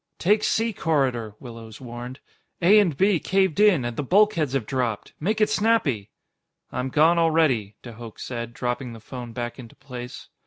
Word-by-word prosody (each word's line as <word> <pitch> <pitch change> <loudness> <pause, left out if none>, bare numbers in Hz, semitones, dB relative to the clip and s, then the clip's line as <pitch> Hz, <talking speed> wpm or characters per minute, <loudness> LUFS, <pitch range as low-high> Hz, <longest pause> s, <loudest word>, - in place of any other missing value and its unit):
"Take 210 +4 +2
C 225 0 +1
corridor," 130 - 0
Willows 115 -3 -10
warned. 125 +1 -8 0.4
"A 195 +5 +6
and 175 -9 +1
B 195 -3 +3
caved 190 -1 +1
in, 195 -11 +5
and 120 -1 -3
the - - -2
bulkheads 170 -3 +2
have 135 -5 0
dropped. 120 -3 -2
Make 210 +7 -1
it 215 - +4
snappy!" 190 - +1 0.6
"I'm 125 +1 -2
gone 160 +5 +4
already," 155 -11 +2
de 120 - -8
Hooch 115 -1 -11
said, 120 -2 -5
dropping 125 0 -3
the 115 - -10
phone 120 +1 -8
back 120 +2 -5
into 115 -3 -11
place. 125 -2 -9
130 Hz, 170 wpm, -24 LUFS, 120-175 Hz, 0.6 s, A